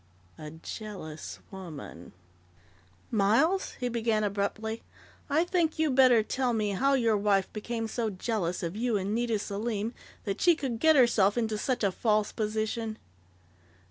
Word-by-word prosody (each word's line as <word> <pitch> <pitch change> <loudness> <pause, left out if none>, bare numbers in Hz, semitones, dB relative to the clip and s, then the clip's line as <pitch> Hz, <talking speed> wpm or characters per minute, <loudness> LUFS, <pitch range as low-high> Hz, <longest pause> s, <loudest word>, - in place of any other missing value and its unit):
A 155 -1 -7
jealous 160 -1 -7
woman 155 - -9 1.0
"Miles," 230 - +2
he 250 - -1
began 225 -2 0
abruptly, 210 +2 -2 0.5
"I 305 +4 +3
think 345 -3 0
you'd 315 -3 +2
better 255 -4 +6
tell 250 +2 0
me 215 -2 0
how 275 +8 +2
your 230 -4 +3
wife 200 -2 +1
became 225 +1 -3
so 225 0 -1
jealous 185 -3 -2
of 170 +2 -3
you 230 0 +1
and 195 +1 -2
Nita 230 -1 +1
Selim 210 +2 -3 0.3
that 195 -2 -3
she 345 -2 +6
could 255 -7 -3
get 315 +3 +5
herself 235 -5 +4
into 220 -2 0
such 245 +3 -1
a 200 - +3
false 215 +1 +1
position." 220 +1 -2
220 Hz, 145 wpm, -29 LUFS, 200-240 Hz, 1.0 s, better